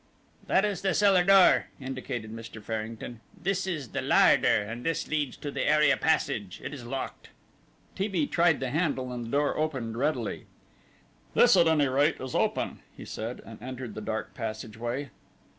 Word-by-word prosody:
"That 195 - +3
is 200 -4 -2
the 190 -1 +1
cellar 195 -3 +5
door," 195 0 +6
indicated 130 -4 -5
Mr. 115 0 -8
Farrington, 110 +2 -5 0.2
"this 190 0 -1
the 155 - -3
larder, - - +5 0.2
and 115 +4 -7
this 165 -2 -1
leads 150 -4 -2
to 145 - -5
the - - -3
area 150 -1 +5
passage. 115 - 0
It - - -5
is 135 -4 -8
locked." 135 +2 -5 0.6
T. 195 +2 -1
B. 180 -7 0
tried 170 0 +2
the 130 -2 -2
handle, 140 -5 -1
and 120 -1 -5
the - - -7
door 145 0 +1
opened 130 -8 -2
readily. 130 -4 -2 0.9
"This - - +6
at 170 -2 +5
any 150 -3 +3
rate 140 +4 +2
is 130 -1 -6
open," - - 0 0.2
he - - -9
said, 115 +3 -5
and 110 -1 -11
entered 125 -2 -6
the 110 - -6
dark 110 +1 -4
passageway. 115 +3 -5
135 Hz, 170 wpm, -28 LUFS, 115-160 Hz, 0.9 s, door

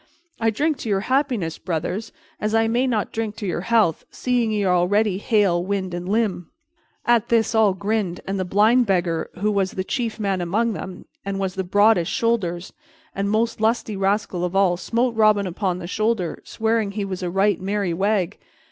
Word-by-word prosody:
I 225 -1 +2
drink 295 +7 0
to 225 - -5
your 195 -1 +1
happiness, 250 - 0
brothers, 180 +5 -3 0.3
as 215 +1 -1
I 225 0 +3
may 245 +3 +1
not 220 -5 -1
drink 220 -2 -3
to 220 -2 -6
your 175 -2 -2
health, 215 -6 +2
seeing 245 -3 0
ye 210 -1 0
are 185 -2 +2
already 195 +2 +2
hale, 200 -6 +2
wind 190 -1 -2
and 175 +1 -4
limb." 205 -5 0 0.6
At 235 -2 +3
this 230 -1 +2
all 215 -4 +4
grinned, 200 -3 -1
and 195 0 -2
the - - 0
Blind 215 +6 +3
beggar, 175 -4 0
who 205 +4 0
was 195 -2 +1
the 185 - -2
chief 230 +2 -3
man 195 -3 -1
among 215 +7 0
them, 185 -2 -7 0.2
and 200 0 -3
was 190 -1 -2
the 190 0 -2
broadest 205 -1 +3
shouldered 190 -7 -1 0.4
and 200 +1 -1
most 220 +1 0
lusty 220 -1 +1
rascal 195 -2 0
of 180 +1 -2
all, 195 -2 +4
smote 235 +6 0
Robin 215 -2 +3
upon 185 0 -2
the 180 - -7
shoulder, 215 -2 -1
swearing 220 -2 -1
he 205 -1 -2
was 190 -1 -5
a 180 - -2
right 195 +1 +1
merry 195 -2 -1
wag. 195 +1 0
200 Hz, 190 wpm, -22 LUFS, 185-225 Hz, 0.6 s, all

